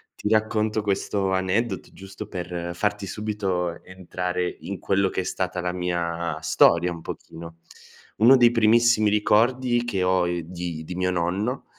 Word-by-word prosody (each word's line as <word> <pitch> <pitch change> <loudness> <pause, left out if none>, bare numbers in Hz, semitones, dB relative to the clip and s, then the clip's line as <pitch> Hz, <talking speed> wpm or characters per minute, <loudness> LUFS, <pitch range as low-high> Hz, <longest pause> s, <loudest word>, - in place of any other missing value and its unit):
Ti 105 - -3
racconto 110 0 +1
questo 100 -1 -1
aneddoto 95 +5 -1
giusto 95 +2 -10
per 85 -2 -5
farti 105 +2 -1
subito 95 -5 -3
entrare 90 -1 -4
in 100 - -6
quello 95 -1 +1
che - - -2
è - - -5
stata 90 0 -3
la 90 0 -2
mia 85 -2 -2
storia, 85 +1 +4
un 85 - -9
pochino. 85 +1 -9 0.6
Uno 125 +5 +7
dei 120 -1 +6
primissimi 115 -1 +4
ricordi 120 +4 +2
che 95 -6 -1
ho, 90 -1 +2
ehm, 85 -1 -2
di 85 -1 -6
di 90 - -6
mio 90 0 0
nonno, 95 +9 -2
95 Hz, 155 wpm, -24 LUFS, 90-105 Hz, 0.6 s, Uno